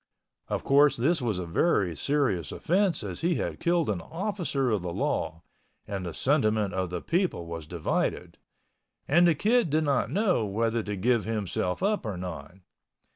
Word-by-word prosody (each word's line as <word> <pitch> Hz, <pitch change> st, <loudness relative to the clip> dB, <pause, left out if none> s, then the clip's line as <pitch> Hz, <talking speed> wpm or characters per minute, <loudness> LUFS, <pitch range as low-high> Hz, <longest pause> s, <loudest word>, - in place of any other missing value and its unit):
Of -, -, -2 dB
course 145 Hz, +1 st, +5 dB
this 150 Hz, +7 st, +2 dB
was 110 Hz, -6 st, -1 dB
a 90 Hz, -, -3 dB
very 90 Hz, -, +1 dB
serious 95 Hz, -, 0 dB
offense 190 Hz, +1 st, +1 dB
as -, -, -5 dB
he 170 Hz, +1 st, +1 dB
had -, -, -3 dB
killed 170 Hz, -2 st, +1 dB
an 100 Hz, -5 st, -1 dB
officer 165 Hz, -, -2 dB
of 105 Hz, -4 st, +1 dB
the 90 Hz, -1 st, -4 dB
law, 85 Hz, 0 st, -2 dB, 0.4 s
and 100 Hz, -2 st, -4 dB
the 85 Hz, -, -5 dB
sentiment 110 Hz, -8 st, +1 dB
of 95 Hz, -1 st, -1 dB
the 90 Hz, -1 st, -5 dB
people 170 Hz, -, 0 dB
was 85 Hz, -2 st, -7 dB
divided—and 170 Hz, -, -2 dB
the 165 Hz, -, +4 dB
Kid 220 Hz, -, +2 dB
did 155 Hz, +2 st, +2 dB
not 140 Hz, -4 st, +1 dB
know 190 Hz, -, +1 dB
whether 115 Hz, +3 st, 0 dB
to 105 Hz, -1 st, -4 dB
give 115 Hz, +3 st, +1 dB
himself 105 Hz, -, -2 dB
up 205 Hz, -3 st, +1 dB
or 100 Hz, -4 st, -3 dB
not. 85 Hz, -3 st, -7 dB
115 Hz, 170 wpm, -27 LUFS, -, 0.4 s, course